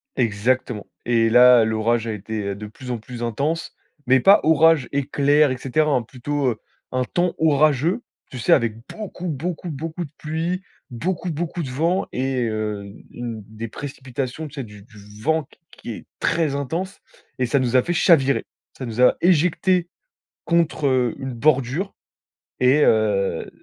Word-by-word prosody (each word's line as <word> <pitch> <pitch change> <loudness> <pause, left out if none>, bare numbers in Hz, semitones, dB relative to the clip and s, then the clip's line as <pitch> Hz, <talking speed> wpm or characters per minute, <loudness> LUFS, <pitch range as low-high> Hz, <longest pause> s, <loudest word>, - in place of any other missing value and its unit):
Exactement. 115 0 0 0.2
Et 115 -1 +3
là, 125 0 +7
l'orage 110 +1 0
a 110 - -2
été 105 -1 -4
de 105 +2 -8
plus 125 +4 -8
en 120 - -1
plus 120 +2 -8
intense, 145 +9 -2 0.3
mais 130 +1 +5
pas 195 +10 +7
orage, 160 -2 +4
éclair, 145 +1 +2
et 130 - -2
cetera, 150 +4 +1
hein 130 -3 +2
plutôt, 135 +4 -3
heu, 115 - -3 0.3
un 130 0 0
temps 175 +7 0
orageux. 155 - +2 0.3
Tu 130 - -7
sais, 115 - 0
avec 115 -2 +4
beaucoup, 195 -4 -7
beaucoup, 170 +3 -4
beaucoup 160 +3 -5
de 145 - -10
pluie, 165 +4 -2 0.3
beaucoup, 170 +8 -3
beaucoup 170 +2 -3
de 135 - -5
vent 165 +8 0
et 130 -1 -1
heu, 105 -2 -3
u 100 +1 -13
une 120 -2 -6
des 110 +1 -7
précipitations, 135 +2 -5
tu 140 - -15
sais. 140 - -4
Du 105 -3 -12
du 105 -1 -15
vent 160 +4 +1
q - - -23
qui - - -9
est 110 - -8
très 165 -4 +1
intense 165 +8 -3 0.4
et 130 - +1
ça 140 +4 +1
nous 125 -1 0
a 125 - +5
fait 175 - -1
chavirer. 140 -8 +3 0.3
Ça 130 - -5
nous 115 0 -6
a 125 - +6
éjectés 180 +1 +3 0.6
contre, 170 -3 +1
heu, 125 -3 +1
une 130 0 -4
bordure 140 - +1 0.7
et, 130 +4 +4
heu, 105 -3 +1
130 Hz, 170 wpm, -22 LUFS, 115-160 Hz, 0.7 s, là